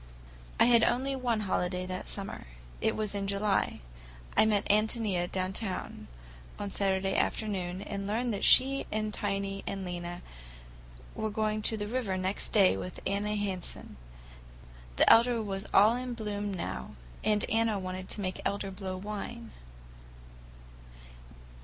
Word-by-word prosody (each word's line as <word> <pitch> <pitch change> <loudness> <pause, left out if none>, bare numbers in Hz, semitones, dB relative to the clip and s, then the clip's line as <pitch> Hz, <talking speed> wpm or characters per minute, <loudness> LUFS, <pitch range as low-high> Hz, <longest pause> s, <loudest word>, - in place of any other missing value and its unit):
I - - +7
had 235 -1 +6
only 270 +2 +1
one 240 -4 0
holiday 180 -2 -1
that 185 0 -5
summer. 195 - -4 0.3
It - - +1
was 215 -2 -1
in 200 -1 -2
July. 200 0 0 0.5
I 220 - +6
met 210 -2 +2
Ántonia 210 -4 +1
downtown 190 +1 -3 0.5
on 205 -1 -4
Saturday 195 -1 +1
afternoon, 190 -3 -1
and 200 -1 -4
learned 230 +3 0
that 200 - -3
she 270 +1 +5
and 215 0 -1
Tiny 195 -1 -2
and 195 -1 -3
Lena 175 0 -5 0.9
were 220 - -2
going 215 0 0
to 220 +1 0
the 205 0 -3
river 220 -5 -1
next 185 +2 -1
day 195 -4 +5
with 180 - -6
Anna 210 +1 0
Hansen—the 195 -4 -3 1.1
elder 235 +1 +6
was 195 -2 -3
all 215 +4 +6
in 250 -1 -4
bloom 205 -2 -3
now, 65 - -5 0.3
and 210 0 +2
Anna 225 -1 +2
wanted 185 0 -5
to 210 - -3
make 185 -1 -3
elder 200 -1 -2
blow 190 -1 -5
wine. 195 - -6
205 Hz, 140 wpm, -30 LUFS, 190-215 Hz, 1.1 s, I